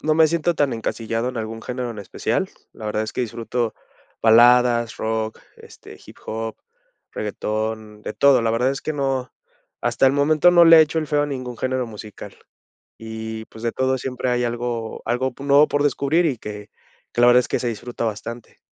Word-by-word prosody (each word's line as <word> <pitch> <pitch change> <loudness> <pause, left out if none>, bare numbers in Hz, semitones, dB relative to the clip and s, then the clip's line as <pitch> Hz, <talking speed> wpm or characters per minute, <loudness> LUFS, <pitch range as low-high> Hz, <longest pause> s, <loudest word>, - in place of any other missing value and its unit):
no 155 0 +1
me 160 0 +5
siento 170 +1 0
tan 145 -4 +1
encasillado 115 +1 -2
en 130 - -6
algún 115 0 -5
género 125 +1 -4
en 110 - -8
especial, 100 - -2 0.2
la 110 - -8
verdad 105 0 -1
es 110 - -5
que - - -3
disfruto 115 0 -2 0.5
baladas, 120 +1 +5
rock, 110 0 -3 0.2
este, - - -14
hip - - -14
hop, 110 0 -4 0.6
reguetón, 110 0 -4
de - - -5
todo. 140 0 +4
La 115 -1 +1
verdad 125 +3 +2
es 135 - -4
que 155 - -3
no 135 -3 -2 0.5
hasta - - +2
el 130 - +4
momento 155 +4 +4
no 175 -1 +7
le 165 0 +9
he - - +9
hecho 155 +1 -1
el 155 - -5
feo 145 -1 +2
a - - -1
ningún 130 -4 -5
género 130 0 -1
musical. 105 -2 -10 0.6
Y, 110 0 -6
pues, 110 +1 -13
de 115 - 0
todo 130 +1 0
siempre 125 0 -3
hay 125 0 +1
algo 120 -1 -3
algo 125 +2 -1
po 135 - -11
nuevo 140 +2 +6
por 145 0 +1
descubrir 145 +4 +2
y 140 -6 0
que 105 -1 -8 0.4
que 120 - 0
la 120 - +7
verdad 125 0 +7
es - - -7
que - - -1
se 125 - -2
disfruta 120 +2 -5
bastante. 115 +2 -6
120 Hz, 200 wpm, -22 LUFS, 110-135 Hz, 0.6 s, le